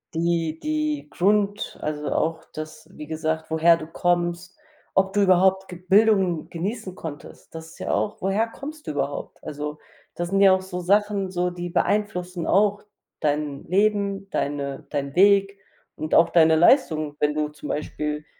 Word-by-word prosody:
Die 165 -1 0
die 305 -1 -2
Grund 205 +2 0
also, 150 -1 -3
auch 160 0 -1
das, 155 0 -8
wie 150 - -9
gesagt, 160 +1 -3
woher 165 +1 +5
du 155 - -7
kommst, 175 +1 -1 0.4
ob 190 0 +2
du 205 - +2
überhaupt 190 0 +3
ge 180 - -9
Bildung 195 -5 +3
genießen 190 +2 -4
konntest. 155 -4 -10
Das 160 0 -8
ist - - -16
ja - - -3
auch 210 - -1
woher 195 +4 +1
kommst 300 +6 -9
du - - -1
überhaupt? 140 -1 -4
Also, 150 0 -5 0.4
das 175 0 -3
sind 195 +1 +2
ja 195 -1 +7
auch 190 0 0
so 180 -1 -6
Sachen 200 +1 +1
so, 180 -1 -1
die 175 0 -6
beeinflussen 180 -3 -1
auch 205 +1 +3 0.4
dein 145 -1 -1
Leben, 200 0 +1
deine 140 -1 -3
dein 140 -1 -3
Weg 200 +1 +4 0.4
und 155 - -2
auch 165 - +6
deine 160 -2 +5
Leistung, 155 - +3
wenn 150 0 +1
du 150 0 -1
zum 150 0 -10
Beispiel 150 0 -3
175 Hz, 165 wpm, -24 LUFS, 155-200 Hz, 0.4 s, ja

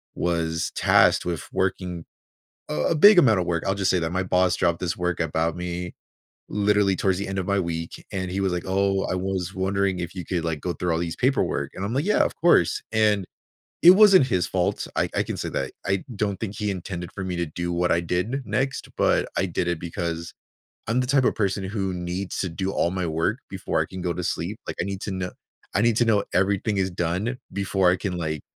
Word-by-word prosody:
was 80 -2 -1
tasked - - +4
with 85 -2 -2
working 90 -3 -1 0.7
a 75 - 0
big 200 +4 +8
amount 110 - +5
of 90 - 0
work- 85 -1 -1
I'll 95 - +1
just 95 -1 +1
say 90 - +2
that 80 0 -2
my 95 +1 0
boss 90 0 +2
dropped 85 -2 +1
this 90 -2 -2
work 90 0 -1
about 80 0 0
me 90 0 -4 0.6
literally 105 -1 +2
towards 95 -1 +1
the 100 - -3
end 95 0 -2
of 90 - -3
my 100 -1 +2
week. 85 -2 -4
And 95 -3 -3
he 100 +1 -1
was 95 -2 +1
like, 90 - -2
"Oh, 95 0 +1
I - - -1
was 95 0 -2
wondering 95 0 0
if 85 -1 -4
you 90 -3 -5
could, 85 -3 -2
like, 80 -2 -2
go 90 - -2
through 90 -1 -2
all 80 - 0
these 85 -1 -3
paperwork?" 130 +2 0
And 95 - -4
I'm 110 - -3
like, 135 +3 +1
"Yeah, 210 - +3
of - - -3
course." 85 - +3
And, 105 -3 +3 0.6
it 175 - +11
wasn't 195 -6 +7
his 90 -7 +1
fault. 90 -2 -1
I - - +1
I - - +2
can - - -5
say - - -3
that. - - -3
I 95 -1 0
don't 100 -1 -1
think 105 -2 -4
he 105 -1 -1
intended 90 -2 -5
for 95 - -5
me 90 -1 -3
to 85 - 0
do 85 +3 -4
what 90 0 +1
I 85 - +3
did 90 +11 -2
next, 135 +1 -2
but - - +2
I 95 - +2
did 85 0 -2
it 85 -2 -1
because 85 -1 -4 0.5
I'm 115 +3 +1
the 125 - -1
type 135 -1 +3
of - - +2
person 100 -2 -1
who 95 -1 -2
needs 90 +2 -4
to 95 - -1
do 95 +3 -3
all 85 - +1
my 95 -2 -2
work 80 +1 -1
before - - -2
I - - 0
can 95 - -8
go 90 - 0
to 90 - -4
sleep, - - -3
like, - - -4
I - - 0
need 100 0 -4
to - - -3
kno 95 -1 -3 0.4
I 100 - +2
need 115 -2 +3
to 120 - +4
know 105 -3 +3
everything 100 +3 +1
is 95 0 +1
done 90 +8 -2
before 95 -2 +2
I 90 - +2
can, 90 -1 -3
like, 80 -3 -3
95 Hz, 235 wpm, -24 LUFS, 85-100 Hz, 0.7 s, it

